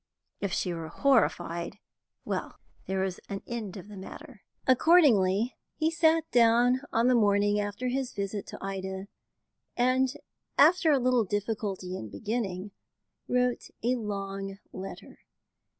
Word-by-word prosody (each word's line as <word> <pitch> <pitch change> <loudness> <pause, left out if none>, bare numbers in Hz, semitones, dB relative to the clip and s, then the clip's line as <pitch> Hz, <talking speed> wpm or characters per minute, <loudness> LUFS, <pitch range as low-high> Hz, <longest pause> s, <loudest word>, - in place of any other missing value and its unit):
If 200 - -2
she 180 0 -1
were 165 -1 -5
horrified, 200 -8 +1 0.5
well, - - -3 0.3
there 190 0 0
was 190 -1 -2
an 195 0 -5
end 220 -5 -5
of 190 - -10
the 210 - -10
matter. 230 +5 -10 0.2
Accordingly, 250 - +4 0.2
he 315 +1 +1
sat 325 -1 +3
down 240 +2 +4
on 230 +1 +2
the 255 - +5
morning 205 -2 +3
after 205 +4 -3
his 260 0 -2
visit 200 0 -4
to - - -8
Ida, 190 0 -4 0.7
and, 255 +1 +3 0.5
after 330 +2 +6
a 285 - +5
little 250 -2 +3
difficulty 205 -2 -3
in 110 - -6
beginning, 205 - -3 0.6
wrote 250 0 0
a 245 +2 +2
long 195 -3 -4 0.2
letter. 190 +1 -8
210 Hz, 135 wpm, -29 LUFS, 195-250 Hz, 0.7 s, after